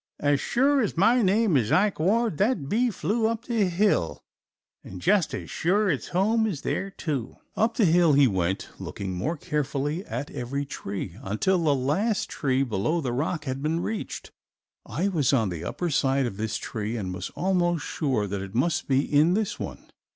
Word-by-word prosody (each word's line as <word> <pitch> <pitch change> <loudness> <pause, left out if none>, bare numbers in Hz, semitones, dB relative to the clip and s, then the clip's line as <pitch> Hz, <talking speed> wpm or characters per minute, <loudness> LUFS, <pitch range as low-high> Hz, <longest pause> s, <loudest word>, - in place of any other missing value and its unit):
"As 145 -1 +2
sure 275 +3 +2
as 210 -7 -2
my 235 +7 +4
name 205 -2 +3
is 115 -5 +2
Ike 200 -1 +3
Ward 210 +2 +1
that 205 - +1
bee 240 - +2
flew 220 +1 0
up 230 +1 -3
the 230 -4 +1
hill, 180 - +1 0.6
and 95 - -9
just 180 - +2
as - - -7
sure 200 +3 +2
its 140 - -3
home 220 +5 +2
is 170 -10 -4
there, 195 - -2
too." 145 - -4 0.2
Up 225 +2 +1
the 220 - +4
hill 170 -2 +4
he 140 0 +6
went, 95 -5 -1
looking 95 -2 -5
more 110 - -2
carefully 150 0 -2
at 145 - -4
every 140 +4 -3
tree, 100 -8 -6
until 170 - 0
the 145 -3 +3
last 175 - 0
tree 135 -1 0
below 125 - 0
the 130 -6 -2
rock 155 +4 -2
had 135 0 -3
been 160 +3 0
reached. 220 +3 -5 0.6
I 195 - -1
was 155 -9 +1
on 115 -7 +2
the 85 -2 -5
upper 175 - -3
side 135 -2 +2
of 100 -5 -4
this 110 0 -2
tree 110 +2 -4
and 95 -4 -4
was 90 +1 -5
almost 175 -3 +1
sure 130 -9 -1
that 100 0 -4
it 95 +2 -8
must 155 +7 +1
be 135 0 +3
in 155 +5 +3
this 215 -1 -1
one. - - -6
155 Hz, 190 wpm, -26 LUFS, 125-195 Hz, 0.6 s, he